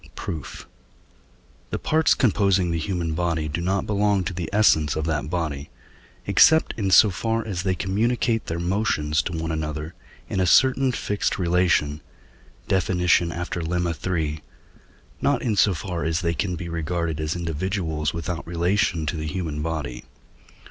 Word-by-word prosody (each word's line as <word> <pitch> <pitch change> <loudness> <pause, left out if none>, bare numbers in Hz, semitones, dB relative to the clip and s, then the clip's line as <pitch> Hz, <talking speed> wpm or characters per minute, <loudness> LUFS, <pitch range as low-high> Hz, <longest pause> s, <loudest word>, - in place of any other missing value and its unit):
Proof. 80 -4 -6 1.0
The - - -2
parts 160 0 +2
composing 100 - +2
the 85 - -1
human 85 -1 -2
body 80 -2 -1
do 80 +3 -3
not 95 +2 0
belong 105 -2 +1
to 90 - -4
the 85 -3 -4
essence 90 -8 +3
of 80 0 -2
that 75 -2 -2
body, 80 -5 -3 0.6
except 160 0 +5
in 100 -4 -1
so 100 +2 +7
far 115 +4 -1
as 95 -5 -3
they 95 0 0
communicate 115 +4 0
their 85 - -3
motions 85 -5 0
to - - -5
one 80 -1 -3
another 75 0 -4 0.3
in - - -2
a 90 - +2
certain 130 +6 +4
fixed 105 -4 -1
relation 85 -4 +1 0.7
(Def. 95 -2 +1
after 90 -1 +1
Lemma 85 +1 -1 0.2
iii.), 80 -3 -1 0.8
not 140 -3 +1
in 115 -4 0
so 100 -2 +3
far 85 +2 -4
as 80 +1 0
they 85 -1 0
can 90 +3 -2
be 85 +1 -6
regarded 85 -1 -2
as 80 +1 -2
individuals 85 -2 -2
without 85 0 -5
relation 85 -1 0
to 80 - -2
the 80 0 -4
human 80 -3 -3
body. 75 -6 -4
85 Hz, 155 wpm, -24 LUFS, 80-95 Hz, 1.0 s, so